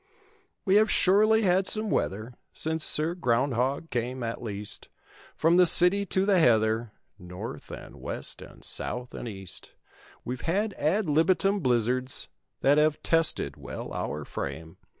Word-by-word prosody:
We 195 0 +4
have 215 +1 +3
surely 215 +4 +3
had 190 0 +2
some 215 -1 0
weather, 110 +5 -2 0.2
Since 160 0 -2
Sir 155 +3 +2
Groundhog 135 0 -1
came, 125 +1 -3
at 115 0 -4
least; 105 -3 -7 0.5
From 165 +2 +3
the 180 -1 +6
city 190 +4 +7
to 190 +1 +1
the 195 -3 +3
heather. 110 -4 +2 0.3
North, 90 0 -9
and - - -10
west - - -6
and - - -14
south 125 0 -6
and - - -7
east. 95 -4 -7 0.5
We've 125 +1 -5
had 200 +5 -1
ad 180 +5 0
libitum 180 +6 +2
blizzards 125 - 0 0.3
That 145 +2 +4
have 150 0 +1
tested 165 -1 0
well - - -8
our 75 0 -4
frame. 80 0 -7
150 Hz, 145 wpm, -27 LUFS, 120-185 Hz, 0.5 s, city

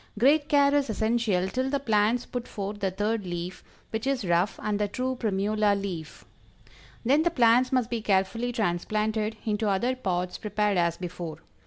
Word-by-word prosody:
Great 290 +6 +4
care 285 -1 +4
is 285 -3 +2
essential 220 -4 +1
till 255 +6 -1
the 280 0 0
plants 225 -1 +2
put 245 -1 -5
forth 205 0 -5
the 195 -1 0
third 210 +3 -1
leaf, 175 0 -5 0.3
which 225 +3 -3
is 265 -6 0
rough 175 +2 +1
and 210 -1 -1
the 210 - +1
true 255 +5 -2
primula 210 -2 +1
leaf. 175 -6 -6 0.8
Then 280 +6 +4
the 345 - +3
plants 250 -3 +4
must 250 -3 +1
be 235 -2 -1
carefully 210 +4 +1
transplanted 215 +1 -1
into 215 -1 0
other 235 +7 +1
pots 180 -7 -2
prepared 210 -2 0
as 170 -1 +1
before. 170 -3 -6
215 Hz, 170 wpm, -27 LUFS, 195-245 Hz, 0.8 s, Great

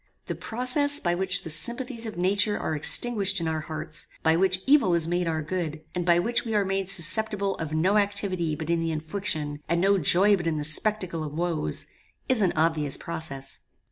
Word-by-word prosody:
The - - -4
process 285 +5 0
by 175 -2 -1
which 185 +1 0
the 160 - -3
sympathies 235 - 0
of 215 - -8
nature 200 +3 0
are 155 - -3
extinguished 200 +4 +4
in 165 - -3
our 160 -1 -2
hearts, 155 0 -2 0.2
by 160 0 +3
which 185 +1 0
evil 270 -11 +3
is 165 -1 0
made 175 0 -1
our 160 -1 -2
good, 160 -2 -4
and 180 -1 -4
by 170 -1 +4
which 230 +7 0
we 225 -2 -4
are 205 -1 +1
made 195 0 -2
susceptible 200 +3 +3
of 160 -2 -6
no 180 +7 +1
activity 200 -5 0
but 160 +2 -5
in 170 - +1
the 165 0 -2
infliction, 155 -2 -3
and 170 +1 +1
no 195 +2 +2
joy 190 +6 +4
but 175 -3 -5
in 165 - -1
the 150 - -3
spectacle 170 +1 -1
of 150 -1 -7
woes, 165 - -1 0.4
is 255 -4 +2
an 185 -3 +2
obvious 155 -3 0
process. 135 -5 -4
175 Hz, 205 wpm, -25 LUFS, 160-205 Hz, 0.4 s, extinguished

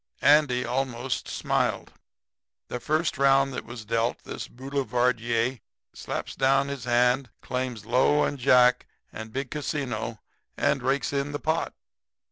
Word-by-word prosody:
Andy 140 -4 +4
almost 125 0 -2
smiled. - - -1 0.8
"The 125 - -3
first 155 +4 0
round 135 0 +4
that - - -5
was 120 -1 -9
dealt, 115 +2 -1
this - - -6
boulevardier 125 -2 -1 0.3
slaps - - -5
down 135 +1 +2
his 140 -3 -5
hand, 125 +2 +2
claims 125 -4 -3
low 130 +5 +3
and 145 - -2
jack 125 -1 +4 0.3
and 110 0 -7
big 135 +1 -4
casino 130 -7 -3 0.4
and 135 - +1
rakes 135 +3 0
in 140 +1 -1
the 145 - -3
pot. 160 +2 -1
130 Hz, 130 wpm, -26 LUFS, 120-140 Hz, 0.8 s, Andy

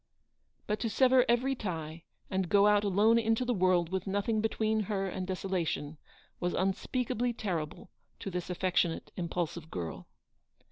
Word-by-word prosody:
But 210 0 -1
to 230 - -1
sever 255 +2 +5
every 250 +3 +3
tie, 165 -8 -5 0.3
and 190 -2 0
go 205 -1 +5
out 210 0 +5
alone 210 +4 +4
into 225 +2 +1
the 245 - +1
world 180 -4 +2
with 190 +1 -2
nothing 205 +3 0
between 220 0 +1
her 195 -2 0
and 185 -1 -4
desolation, 175 -5 -2 0.4
was 175 0 -1
unspeakably 240 +5 0
terrible 175 -7 -4 0.3
to 195 - -4
this 180 0 -4
affectionate, 180 -2 0
impul 175 -1 -1
sive 160 0 -10
girl. 85 - -5
195 Hz, 150 wpm, -31 LUFS, 175-220 Hz, 0.4 s, sever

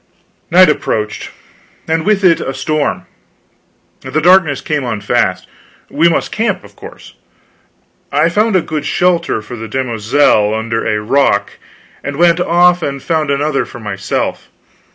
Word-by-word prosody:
Night 185 +2 +6
approached, 110 -7 -2 0.6
and 160 +2 -1
with 210 -2 +2
it 170 -3 +4
a 135 - -4
storm. 155 -2 -1 1.0
The 155 - -2
darkness 170 -4 +4
came 150 -3 -2
on 115 -4 -3
fast. 100 - -1 0.4
We 165 +4 +3
must 165 - -1
camp, 225 +2 -1
of - - -16
course. - - -13 1.0
I - - +3
found 210 +4 +1
a 185 - +4
good 155 -2 -4
shelter 170 -10 0
for 115 +3 -8
the 115 -1 -7
demoiselle 115 -2 +1
under 115 +1 -2
a 105 - 0
rock, 135 +7 0 0.4
and 140 - -4
went 170 +2 +3
off 175 0 +3
and 140 -3 -3
found 155 +1 -1
another 140 0 0
for 120 - -11
myself. 100 -3 -4
150 Hz, 145 wpm, -14 LUFS, 115-170 Hz, 1.0 s, Night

